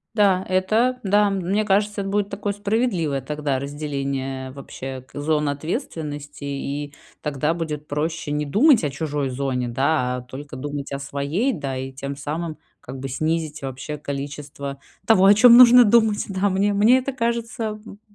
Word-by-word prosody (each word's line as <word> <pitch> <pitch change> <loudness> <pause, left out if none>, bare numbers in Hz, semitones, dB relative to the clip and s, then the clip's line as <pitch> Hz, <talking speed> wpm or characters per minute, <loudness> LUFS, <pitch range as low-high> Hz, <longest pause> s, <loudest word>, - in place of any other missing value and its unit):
Да, 195 -3 +3
это 220 +7 +2
да, 205 +1 +3
мне 195 +2 0
кажется, 205 +1 +1
это 195 - -4
будет 205 0 0
такое 200 0 -3
справедливое 200 - 0
тогда 145 0 -2
разделение 140 -2 -4
вообще 135 -1 -7
к - - -24
зон 150 0 +1
ответственности, 150 - -5
и 140 +1 -4 0.3
тогда 150 +1 -1
будет 155 -3 -5
проще 150 +1 -2
не 150 0 -1
думать 235 - +5
о 145 - +1
чужой 145 -1 -2
зоне, 130 -1 -2
да, 125 0 +1
а - - -6
только 130 +2 -9
думать 145 +1 -5
о 140 - -3
своей, 140 - -1
да, 140 - -4
и 130 +1 -5
тем 140 +1 -5
самым, 155 +3 -4 0.2
как 130 +2 -8
бы, 135 - -4
снизить 155 +3 -2
вообще 135 +3 -5
количество 140 -1 -6 0.3
того, 195 -4 +5
о 200 - +8
чём 235 +2 +8
нужно 245 0 +9
думать, 220 -1 +3
да. 195 +1 +1
Мне 200 +2 +1
мне 215 +5 +5
это 260 +1 -3
кажется, 235 -2 -2
м, 215 -1 -5
м, 205 - -12
150 Hz, 170 wpm, -22 LUFS, 140-205 Hz, 0.3 s, нужно